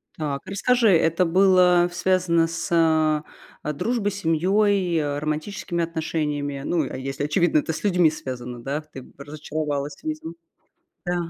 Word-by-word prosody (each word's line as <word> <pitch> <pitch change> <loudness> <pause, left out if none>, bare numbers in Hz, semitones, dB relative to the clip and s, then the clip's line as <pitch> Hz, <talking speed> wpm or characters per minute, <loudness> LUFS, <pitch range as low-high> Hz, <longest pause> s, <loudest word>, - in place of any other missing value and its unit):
Так, 145 -3 -3
расскажи, 230 +4 +2
это 165 +3 +2
было 180 0 +4
связано 175 -2 +2
с, 165 0 -5
а, 160 -2 +3 0.5
дружбой, 205 +5 -1
семьей, 190 +1 +1
а, 145 -1 -2
романтическими 170 +3 -3
отношениями? 150 -4 -3
Ну 160 -6 0
а - - -5
если, 135 +2 -4
очевидно, 155 +1 +2
это 160 - -3
с - - -7
людьми 180 -5 +4
связано, 125 -5 -6
да. 140 +4 -2
Ты 150 -4 -11
б - - -19
разочаровалась 145 0 -4
видимо. 155 +1 -5 0.7
Да. 175 0 -1
160 Hz, 140 wpm, -23 LUFS, 150-180 Hz, 0.7 s, было